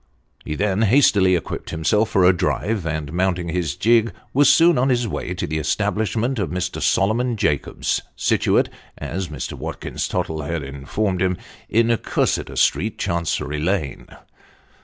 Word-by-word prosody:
He 75 - -4
then 100 +2 0
hastily 105 -5 +4
equipped 85 - -4
himself 105 +8 +1
for 95 -5 +3
a 90 - +6
drive, 95 +1 -1
and 80 -1 -3
mounting 90 -1 0
his 85 -4 -2
gig, 115 0 +3 0.2
was 145 +2 +5
soon 170 -4 +5
on 130 +2 +2
his 120 -2 +1
way 90 -3 -4
to - - -2
the 80 +1 -2
establishment 110 - -1
of 95 -6 -1
Mr. 90 +2 -3
Solomon 115 +4 +1
Jacobs, 75 -8 0
situate - - +2 0.3
(as 95 +1 -4
Mr. 75 -5 -6
Watkins - - -4
Tottle 80 -1 -2
had 75 +1 -3
informed 85 +8 -2
him) 90 -1 +1 0.3
in 115 +1 +3
Cursitor - - -1
Street, - - +1
Chancery 80 -3 -2
Lane. 80 -3 -2
95 Hz, 150 wpm, -21 LUFS, 80-110 Hz, 0.3 s, a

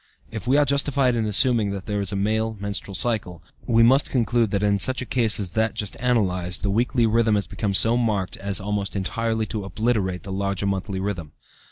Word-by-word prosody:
If 110 0 -7
we 135 +3 +4
are 145 - +4
justified 140 -2 +1
in 110 -2 -1
assuming 110 0 +3
that 100 -1 -5
there 105 -1 -2
is 100 -1 -2
a - - -3
male 110 +2 -1
menstrual 100 -1 -4
cycle, 90 -6 -2 0.2
we 115 -2 +4
must 130 +4 +4
conclude 120 -2 +1
that 100 0 -1
in 100 -1 +2
such 130 +5 +2
a 125 - -3
case 115 -5 +2
as 100 -3 -2
that 110 +4 -1
just 105 -2 -2
analyzed, 95 -8 0
the 100 - 0
weekly 120 +2 +1
rhythm 110 -1 +2
has 100 - 0
become 100 -3 -3
so 115 +4 +4
marked 105 -6 -1
as 100 -1 -3
almost 100 0 -3
entirely 110 +3 -1
to 105 -1 -5
obliterate 95 -2 -1
the 100 - -7
larger 100 0 -2
monthly 95 0 -2
rhythm. 95 -6 -4
105 Hz, 210 wpm, -23 LUFS, 100-115 Hz, 0.2 s, we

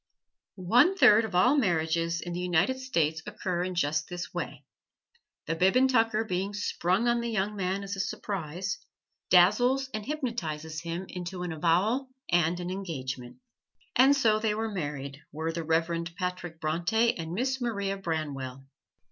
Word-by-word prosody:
One 245 - +4
third 220 - +7
of 200 -5 -6
all 250 +10 +5
marriages 170 - +1
in 175 - -5
the 175 - -3
United 180 +8 +1
States 160 - 0
occur 180 -2 -2
in 185 0 -3
just 155 -2 0
this 175 0 -6
way: - - -5 0.8
the - - -1
bib 185 +5 +3
and 260 +1 +5
tucker 225 -3 +2
being 195 +1 -2
sprung 200 +1 0
on 240 0 +2
the 235 - -2
young 210 -1 -1
man 190 0 -1
as 200 0 -4
a - - -7
surprise, 190 -1 -3 0.5
dazzles 245 +9 +4
and 215 -1 -3
hypnotizes 165 - -4
him 170 +2 -4
into 180 0 -5
an 175 - -3
avowal 185 - +1 0.2
and 175 0 +2
an 175 0 -4
engagement. 135 -10 -5 0.6
And 270 +3 +6
so 220 -5 +3
they 215 -1 0
were 220 0 -2
married 145 -6 -5
were 160 +2 -2
the 165 0 -4
Reverend 165 +1 0
Patrick 180 -3 -4
Bronte 175 +9 +1
and 165 0 -5
Miss 260 +6 -1
Maria 200 -5 -1
Branwell. 145 -8 -4
180 Hz, 160 wpm, -28 LUFS, 165-220 Hz, 0.8 s, third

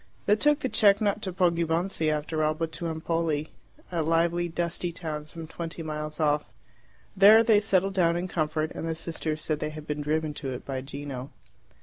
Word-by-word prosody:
They 210 - +5
took 295 +5 +3
the - - 0
cheque 205 -5 +4
not 210 0 0
to 190 - -3
Poggibonsi, 170 -1 +1
after 155 +1 -1
all, 155 0 +2
but 165 +1 -3
to 170 - -4
Empoli 160 -1 -1 0.4
a 170 -2 0
lively, 170 +2 +2
dusty 170 +1 -2
town 155 -3 -5
some 165 +1 -8
twenty 165 +1 -6
miles 155 0 -5
off. 150 -1 +2 0.7
There 210 +3 +8
they 220 -2 +5
settled 195 -2 +1
down 170 -3 +3
in 180 +1 -2
comfort, 155 -2 -1
and 165 - -4
the 160 - -1
sisters 160 -1 -3
said 155 -1 -1
they 150 - -2
had 155 0 -9
been 150 0 -3
driven 155 +1 -1
to 135 -2 -5
it 125 - -7
by 135 -1 -3
Gino. 135 -1 -6
165 Hz, 195 wpm, -27 LUFS, 155-175 Hz, 0.7 s, There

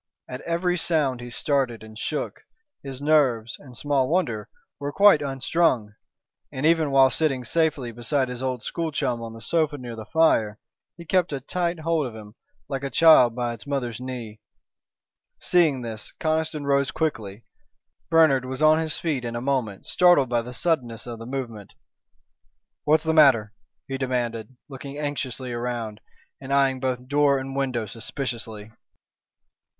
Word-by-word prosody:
At 125 +1 -7
every 175 +1 0
sound 145 -8 +1
he 120 - -7
started 125 -3 -1
and 110 0 -12
shook. 150 +7 -4 0.4
His 135 0 -8
nerves, 130 -7 +2
and 125 -4 -12
small 140 -2 +1
wonder, 150 - -1 0.3
were 145 0 -3
quite 195 -3 +6
unstrung, 135 -4 0 0.6
and 130 +3 -3
even 160 -2 +3
while 135 -1 +5
sitting 135 -5 0
safely 145 -3 0
beside 120 +4 -1
his 125 0 -6
old 130 -3 -2
school 165 -2 -3
chum 130 -5 -1
on 115 -1 -7
the 115 -1 -9
sofa 155 -1 +1
near 120 -3 -7
the 110 -1 -9
fire, 115 -10 +2 0.4
he 170 - -10
kept 180 -1 +1
a 140 - -2
tight 170 +4 -2
hold 160 -3 0
of 115 - -9
him, 105 -1 -11 0.3
like 135 -1 -4
a 140 - -2
child 135 -7 +6
by 120 -1 -2
its 115 +4 -11
mother's 125 -5 -3
knee. 120 -4 -7 1.0
Seeing 155 -8 +2
this, 110 -2 -7
Conniston 155 -2 -1
rose 140 -1 +2
quickly. 115 -10 -3 0.7
Bernard 160 -6 +5
was 130 +3 -3
on 155 +1 +6
his 160 -2 -2
feet 150 -7 -2
in 120 -1 -4
a - - -2
moment, 125 -6 -2
startled 175 -8 +4
by 120 -1 +1
the 120 +2 -8
suddenness 120 -4 -1
of 120 -2 -7
the 115 - -8
movement. 120 -6 -6 1.1
"What's 155 +1 +4
the 160 0 +1
matter?" 130 -9 +5 0.3
he 135 0 -4
demanded, 125 -2 -3
looking 140 0 -8
anxiously 135 -4 -4
around, 120 -3 -4 0.4
and 135 0 -7
eyeing 135 -1 +3
both 125 -1 -3
door 145 0 +3
and 135 0 -5
window 130 -5 -1
suspiciously. 115 -1 -6
130 Hz, 160 wpm, -24 LUFS, 120-150 Hz, 1.1 s, quite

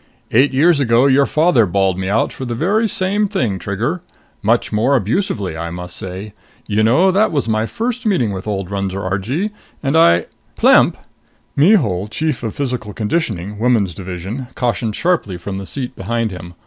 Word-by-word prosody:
"Eight 130 +6 +4
years 150 +4 +4
ago, 120 -1 +3
your 140 0 +4
father 150 - +3
bawled 95 0 +1
me 95 0 -2
out 105 +3 +1
for - - -7
the 120 -2 -3
very 205 - +1
same 200 +3 +1
thing, 120 - -1
Trigger! 115 - -2 0.4
Much 115 +3 +1
more 115 +6 +2
abusively, 110 - -1
I 85 +1 -4
must 90 0 -5
say. 95 +3 -5 0.3
You 105 0 0
know 135 +13 +4
that 205 +4 +2
was 140 -6 -1
my 110 0 0
first 245 - -3
meeting 125 - +1
with 95 +2 -6
old 100 -2 -3
Runser 100 -1 -3
Argee, 115 - -2 0.3
and 135 +2 0
I 85 - +5 0.2
" - - -39
"Plemp!" - - +5 0.6
Mihul, 140 - +3
Chief 155 +3 -2
of 115 -3 -4
Physical 125 -7 -3
Conditioning, 105 - -2
Women's 110 -6 +2
Division, 95 - -6
cautioned 115 -3 -1
sharply 165 - 0
from 95 +2 -5
the 95 - -7
seat 130 -2 -5
behind 115 -2 -2
him. 90 -1 -9
115 Hz, 175 wpm, -18 LUFS, 95-145 Hz, 0.6 s, I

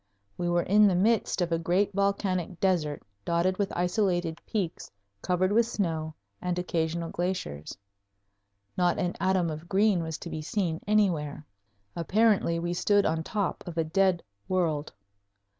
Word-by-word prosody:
We 175 - -2
were 175 0 +2
in 210 +2 +5
the 190 - +2
midst 210 +1 +2
of 175 -1 0
a 165 - +1
great 185 +5 +1
volcanic 190 -3 0
desert 165 -6 0 0.2
dotted 175 - +1
with 200 -1 0
isolated 175 -2 0
peaks 195 -7 -3 0.3
covered 185 +1 +1
with 230 +2 +4
snow 160 -8 -2 0.3
and 180 -1 -1
occasional 170 -1 -1
glaciers. 175 - -3 1.0
Not 175 -1 +2
an 180 -3 -1
atom 185 -3 +1
of 155 +3 -8
green 200 -2 +3
was 160 -1 -4
to 170 - -8
be 155 - -4
seen 165 -1 -2
anywhere. 170 -9 +1 0.5
Apparently 195 0 +2
we 175 +1 -2
stood 205 +3 +3
on 160 0 +1
top 200 +2 -2
of 170 -1 -7
a 165 - +3
dead 185 +2 +2 0.2
world. 160 -5 0
175 Hz, 150 wpm, -28 LUFS, 165-195 Hz, 1.0 s, in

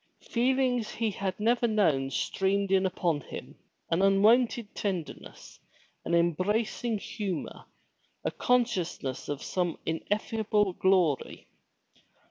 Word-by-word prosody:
Feelings 250 -1 +1
he 225 -2 -1
had 190 -1 -4
never 235 +2 +2
known 160 -12 +2
streamed 195 +7 0
in 190 0 +4
upon 170 -5 -1
him, - - -9 0.4
an 165 +3 +2
unwonted 215 +3 +3
tenderness, 185 -6 -5 0.5
an 170 - +1
em 170 0 +4
bracing 215 +6 -1
humor, 195 -4 -5 0.6
a - - +1
consciousness 185 - -1
of 145 -1 -3
some 175 -3 -1
ineffable 205 +3 0
glory. 180 -7 +1
195 Hz, 105 wpm, -29 LUFS, 175-225 Hz, 0.6 s, in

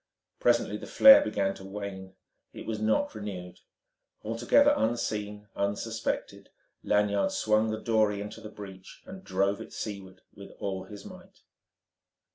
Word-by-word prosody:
Presently - - +2
the - - -9
flare 275 +2 +9
began 100 - -1
to 95 - -12
wane. 95 -1 -7 0.4
It - - -9
was 110 -1 -4
not 110 0 +1
renewed. 95 -4 -7 0.6
Altogether 120 - +4
unseen, 105 -2 -2
unsuspected, 105 +3 -3 0.3
Lanyard 105 - +2
swung 110 - +2
the 110 0 -3
dory 110 -3 +1
into 105 +2 -7
the 110 - -8
breach, 95 -3 -11
and 190 0 -10
drove 100 - 0
it - - -10
seaward 95 -3 -7
with 100 - -11
all 95 -2 -4
his 105 -2 -11
might. - - -13
105 Hz, 135 wpm, -28 LUFS, 100-110 Hz, 0.6 s, flare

